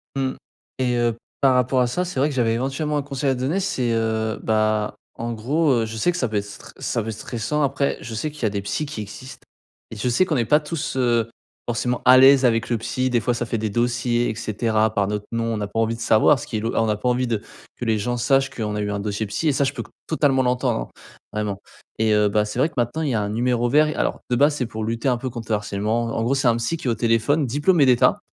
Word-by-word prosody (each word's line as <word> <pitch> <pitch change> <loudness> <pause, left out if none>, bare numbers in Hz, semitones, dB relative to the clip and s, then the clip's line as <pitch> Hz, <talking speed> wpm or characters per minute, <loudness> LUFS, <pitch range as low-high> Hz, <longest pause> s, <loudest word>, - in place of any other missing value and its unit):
Mmh 135 -1 -1 0.4
et 125 -2 0
heu, 120 -1 +1 0.2
par 135 -2 +4
rapport 125 +1 +2
à 125 - +3
ça, 180 +9 -1
c'est 180 -6 -4
vrai 140 - +3
que 145 - -4
j'avais 115 -3 +2
éventuellement 135 +5 -1
un - - 0
conseil 140 -1 -2
à 130 - +2
donner. 145 +10 -1
C'est, 125 -10 -1
heu, 110 -1 -1
bah, 110 -1 +1 0.2
en 120 +1 -3
gros, 140 +8 +1
heu, 115 -3 +2
je 110 - -7
sais 175 +11 +1
que 175 - -5
ça 125 - 0
peut 110 - -5
être 100 - -1
stre 105 - -12
ça - - -1
peut 110 - -5
être 110 - -4
stressant. 120 +8 -3
Après, 140 0 0
je 115 +2 -7
sais 130 +8 -2
qu'il 145 -4 -11
y - - +3
a 110 - +3
des 100 0 -3
psy 100 +10 -2
qui 140 -7 -6
existent 115 +6 -10 0.5
et - - -7
je 115 +4 -1
sais 155 +10 +3
qu'on 160 -5 -1
est 120 - +2
pas 150 +7 +4
tous, 155 -2 -4
heu, 120 -3 +2 0.4
forcément 120 +1 -1
à 130 0 +7
l'aise 135 0 +7
avec 115 -2 +2
le 120 - +1
psy. 130 +3 -2
Des 120 -2 +1
fois, 125 - 0
ça 120 0 -2
fait 115 - -2
des 110 0 -2
dossiers 120 +2 0
et 110 - -3
cetera, 110 0 0
par 100 -1 +1
notre 105 0 -3
nom. 115 0 -1
On - - -2
n'a 105 -1 -3
pas 115 - -3
envie 115 0 +1
de 115 - -10
savoir 115 +5 +4
ce - - -8
qui 110 - -3
est - - -1
lo 115 +2 -2
on 115 -1 +2
a 105 - 0
pas 105 - -3
envie 125 0 +1
de 110 -3 -1 0.4
que 120 - -4
les 110 -1 +2
gens 120 +4 -2
sachent 135 +2 +2
qu'on 110 -6 -4
a 105 - -2
eu 105 0 -2
un 100 - -2
dossier 105 +1 -2
psy 130 +10 -2
et 145 - +2
ça 140 - +1
je 135 - +1
peux - - -5
co - - -19 0.2
totalement 140 -4 +2
l'entendre, 125 - 0 0.4
vraiment 105 -2 -3 0.4
et 110 0 +2
heu, 105 0 +4
bah, 105 +1 +2
c'est 105 +3 -5
vrai 140 - +4
que, - - -24
maintenant, 120 +7 0
il 150 - 0
y 125 - 0
a 110 - +1
un 105 - -2
numéro 120 +2 0
vert 150 +4 +4
et 150 - -3
alors, - - -1
de 125 - +2
base, 145 +4 +3
c'est 125 - -1
pour 110 -1 -5
lutter 115 +3 -2
un 125 -2 +2
peu 130 +1 -4
contre 115 -2 -7
le - - +4
harcèlement. 105 +3 -1
En 115 - 0
gros, 125 +4 +1
c'est 135 -1 +1
un 115 - +2
psy 115 +8 -1
qui 140 - -6
est - - +3
au - - 0
téléphone, 120 +6 +2
diplômé 145 +5 +3
d'État 125 -2 +4
120 Hz, 290 wpm, -22 LUFS, 110-135 Hz, 0.5 s, à